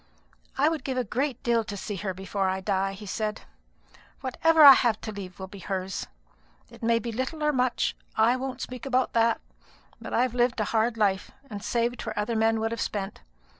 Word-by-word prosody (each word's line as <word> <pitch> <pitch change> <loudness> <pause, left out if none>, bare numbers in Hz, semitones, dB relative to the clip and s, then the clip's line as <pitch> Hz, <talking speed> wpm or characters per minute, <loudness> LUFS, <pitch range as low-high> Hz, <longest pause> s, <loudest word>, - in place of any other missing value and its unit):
"I 280 +3 +4
would 320 -1 -1
give 260 -2 -3
a 255 - +1
great 255 +4 -2
deal 235 -1 +2
to 205 -1 -6
see 200 +1 -5
her 190 +1 -3
before 190 +1 -2
I 190 0 -1
die," 195 0 0
he 205 +2 -10
said. 210 +2 -3 0.8
"Whatever 315 +4 +4
I 280 -2 +13
have 235 -4 +2
to 215 - -5
leave 190 -3 -8
will 190 - -6
be 195 +1 -11
hers. 190 0 -4 0.6
It - - -14
may 230 0 +3
be 230 +1 -3
little 260 +7 -3
or 300 0 +2
much 250 -2 +1 0.2
I 225 +3 +4
won't 260 0 -4
speak 255 +1 -6
about 255 -1 +1
that; 230 0 +3 0.6
but - - -7
I've 250 0 +1
lived 245 -1 +1
a - - +2
hard 230 +2 +1
life, 195 -3 +1 0.2
and 205 -1 -6
saved 240 +1 -1
where 220 -1 -5
other 210 +3 -1
men 225 0 +2
would 225 +1 -1
have 230 - -3
spent. 200 -1 -3
225 Hz, 205 wpm, -27 LUFS, 205-250 Hz, 0.8 s, I